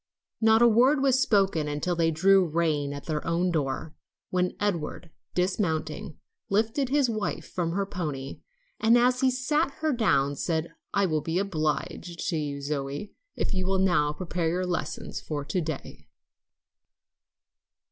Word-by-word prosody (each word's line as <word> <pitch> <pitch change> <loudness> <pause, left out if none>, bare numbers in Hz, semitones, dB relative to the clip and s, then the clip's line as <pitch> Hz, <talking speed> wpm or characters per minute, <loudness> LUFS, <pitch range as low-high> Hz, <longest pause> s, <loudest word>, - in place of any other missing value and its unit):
Not 220 +1 +5
a - - +8
word 250 +6 +5
was 265 -1 +4
spoken 195 -10 +2
until 150 +4 -1
they 165 -1 +2
drew 190 +4 +5
rein 155 -4 0
at 140 0 -6
their 155 -2 -2
own 175 +2 +1
door, 150 0 -2 0.4
when 180 0 0
Edward, 170 -4 -2 0.2
dismounting, 165 -5 -1 0.3
lifted 225 +6 +1
his 280 -1 +3
wife 215 -3 -3
from 170 -2 -2
her 200 +2 0
pony, 150 -8 -5 0.4
and 230 +2 +5
as 250 +1 +3
he 265 - +4
set 280 +6 +1
her 310 0 -1
down, 145 - +2
said, 160 +2 -2 0.2
"I 200 -1 +2
will 155 -4 0
be 165 +4 -2
obliged 170 -1 -2
to 170 - -1
you, 145 -2 -3
Zoe, 140 +6 -4 0.2
if - - -1
you 185 -1 -1
will 190 0 +2
now 175 -6 +3
prepare 170 0 -2
your 180 +2 -1
lessons 180 -2 -3
for 145 -2 -4
to 180 +5 -1
day." 155 -3 -6
175 Hz, 155 wpm, -27 LUFS, 155-210 Hz, 0.4 s, a